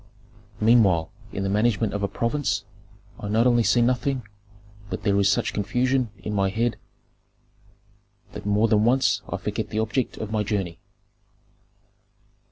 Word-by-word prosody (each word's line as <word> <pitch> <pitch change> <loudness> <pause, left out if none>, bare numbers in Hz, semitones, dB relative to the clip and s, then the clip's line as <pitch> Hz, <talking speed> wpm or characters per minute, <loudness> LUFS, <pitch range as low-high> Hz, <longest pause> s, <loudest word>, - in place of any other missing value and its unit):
Meanwhile 105 -8 +4 0.2
in 95 - -3
the 95 - -1
management 105 +1 +1
of 105 - -2
a 100 - +1
province 125 +8 -1 0.5
I 105 - -5
not 110 +3 +2
only 120 -1 +4
see 120 +1 +3
nothing, 125 +1 0 0.7
but - - -5
there 100 -1 +2
is 100 0 +4
such 100 - +1
confusion 125 +4 0
in 105 +3 -5
my 100 -1 +1
head 115 +4 -1 1.6
that - - -7
more 105 +2 +2
than 105 -1 +3
once 120 -4 +3
I - - -2
forget - - -4
the - - -4
object 110 +3 -1
of 110 -1 -5
my 110 -1 0
journey. 95 -5 -2
110 Hz, 150 wpm, -24 LUFS, 100-120 Hz, 1.6 s, Meanwhile